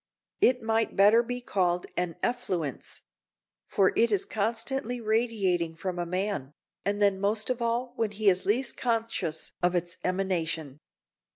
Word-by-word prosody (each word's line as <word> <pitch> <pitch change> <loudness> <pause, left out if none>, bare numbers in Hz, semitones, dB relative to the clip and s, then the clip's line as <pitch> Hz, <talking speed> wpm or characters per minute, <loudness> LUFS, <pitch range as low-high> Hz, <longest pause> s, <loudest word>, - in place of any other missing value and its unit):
It 250 -1 +3
might 225 0 +1
better 210 +4 +6
be 245 +1 -4
called 180 -6 0
an 175 -2 -1
effluence; 185 - -2 0.7
for 195 -1 +3
it 235 0 +3
is 200 -3 +1
constantly 235 +3 -1
radiating 215 -7 0
from 180 +1 -4
a 175 - -2
man, 180 -6 -2 0.3
and 205 +1 -1
then 200 -2 +3
most 215 +4 +1
of 250 -1 -3
all 240 +1 -1
when 225 -2 +1
he 210 +1 -3
is 185 -1 +4
least 240 +5 +1
conscious 225 -9 -1
of 180 0 +2
its 175 0 -2
emanation. 170 -6 -1
205 Hz, 150 wpm, -28 LUFS, 180-230 Hz, 0.7 s, better